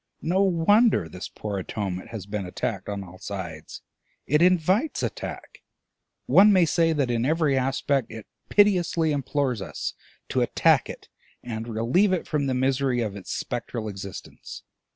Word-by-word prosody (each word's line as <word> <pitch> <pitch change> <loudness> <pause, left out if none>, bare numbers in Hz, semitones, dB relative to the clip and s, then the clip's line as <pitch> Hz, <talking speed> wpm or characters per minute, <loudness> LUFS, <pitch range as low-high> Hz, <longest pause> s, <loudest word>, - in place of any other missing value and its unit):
No 180 +4 +2
wonder 195 - +3
this 90 +4 -8
poor 105 -2 -5
Atonement 95 -1 -4
has 110 -5 -7
been 100 0 -4
attacked 90 - -4
on 100 -1 -4
all 95 0 -13
sides; 85 -6 -7 0.4
it 150 +3 +2
invites 185 - +2
attack; - - -6 0.6
one 205 +2 +6
may 185 -3 +5
say 165 0 +2
that 140 -6 0
in 115 -1 0
every 155 0 +2
aspect 135 0 0
it 110 -2 -8 0.2
piteously 175 -6 +3
implores 140 -4 -1
us 95 - -4 0.4
to - - +1
attack - - +3
it - - -9 0.4
and 115 -1 -5
relieve 120 - +2
it 185 - -1
from 145 -3 -1
the 130 - 0
misery 130 -1 +1
of 105 -3 -3
its 100 - -8
spectral 115 -2 -4
existence. 100 -2 -8
130 Hz, 150 wpm, -25 LUFS, 105-165 Hz, 0.6 s, one